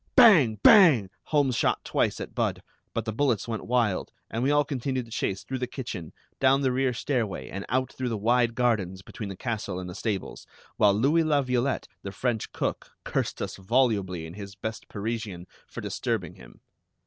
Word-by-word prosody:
Bang! 185 - +7
Bang! 150 - +7
Holmes 140 -5 +2
shot - - +1
twice - - 0
at - - -6
Budd, - - -1 0.3
but 115 - -3
the 110 - -3
bullets 120 -3 +1
went 110 -2 -4
wild, 115 -5 +1 0.2
and 115 - -2
we 130 - +2
all 145 0 +3
continued 130 -2 -2
the 115 - -17
chase 100 -4 -2
through 130 -1 -4
the 125 - -2
kitchen, 115 - -6 0.3
down 135 +1 +4
the 130 -2 +2
rear 130 0 +1
stairway, 120 -4 -2
and 100 +1 -6
out 130 +1 0
through 130 -1 -3
the 115 - -2
wide 115 +2 +2
gardens 105 -7 0
between 105 +1 -7
the 95 - -6
castle 105 -6 -3
and 90 - -6
the 90 - -7
stables, 100 0 -4 0.3
while 105 - +5
Louis 140 +10 +3
La 150 -3 +2
Violette, 125 +1 0
the 100 - -6
French 110 +2 -2
cook, - - -3
cursed - - -2
us - - -5
volubly 100 -5 +1
in 80 - -9
his 100 0 -9
best 110 +1 -6
Parisian 105 -4 -4 0.2
for - - -7
disturbing - - -2
him. - - -16
115 Hz, 190 wpm, -27 LUFS, 100-130 Hz, 0.3 s, Bang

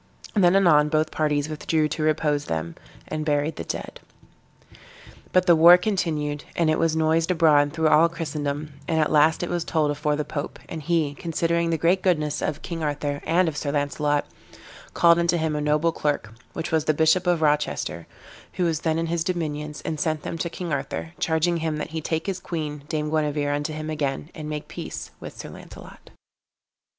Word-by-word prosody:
Then 185 -3 +4
anon 155 -6 +5
both 155 +1 +1
parties 150 -2 0
withdrew 155 0 0
to 160 - -3
repose 150 -1 +1
them, 80 0 -3 0.3
and 155 0 -3
buried 150 +1 0
the - - -4
dead. - - -6 1.3
But 185 0 +3
the 175 -2 +6
war 170 +2 +9
continued, 155 -7 -1
and 165 -2 +2
it 155 - +1
was 165 -1 +2
noised 160 +1 +2
abroad 150 -5 +4
through 160 0 +1
all 165 +3 +5
Christendom, 150 -3 -4
and 160 -2 +1
at 155 - +2
last 155 +2 +4
it 175 - -3
was 175 -1 -1
told 155 -4 +1
afore 150 0 0
the 150 0 -2
pope; 145 -1 -5
and 160 - -6
he, 155 -2 0
considering 170 +2 -1
the 165 - +1
great 175 +4 +2
goodness 155 -6 0
of 155 0 -3
King 170 -2 -5
Arthur, 145 -1 -2
and 175 +2 +3
of 160 - -2
Sir 145 -1 -2
Launcelot, 145 0 0 0.7
called 170 0 +5
unto 170 0 +2
him 160 -2 -1
a 150 - -1
noble 150 +3 +2
clerk, 145 -9 -2 0.2
which 165 - -4
was 160 -2 +1
the 155 - +2
Bishop 160 +4 +3
of 175 -3 +2
Rochester, 150 - 0 0.5
who 180 - -1
was 165 -3 +1
then 160 -1 0
in 165 - 0
his 165 0 -1
dominions, 150 -4 -3
and 155 -2 -3
sent 155 -1 -1
him - - -3
to 170 - -1
King 170 -1 -5
Arthur, 140 +4 -4
charging 165 +1 +1
him 160 -2 -2
that 150 - -5
he 160 0 -3
take 160 +1 -2
his 190 -2 -2
queen, 150 -5 -5
dame 150 -1 -2
Guenever, 150 -2 0
unto 145 +1 -2
him 155 0 -5
again, 145 +1 -3
and 155 -4 -7
make 150 -1 -5
peace - - -7
with - - -9
Sir - - -7
Launcelot. - - -13
155 Hz, 195 wpm, -24 LUFS, 150-165 Hz, 1.3 s, war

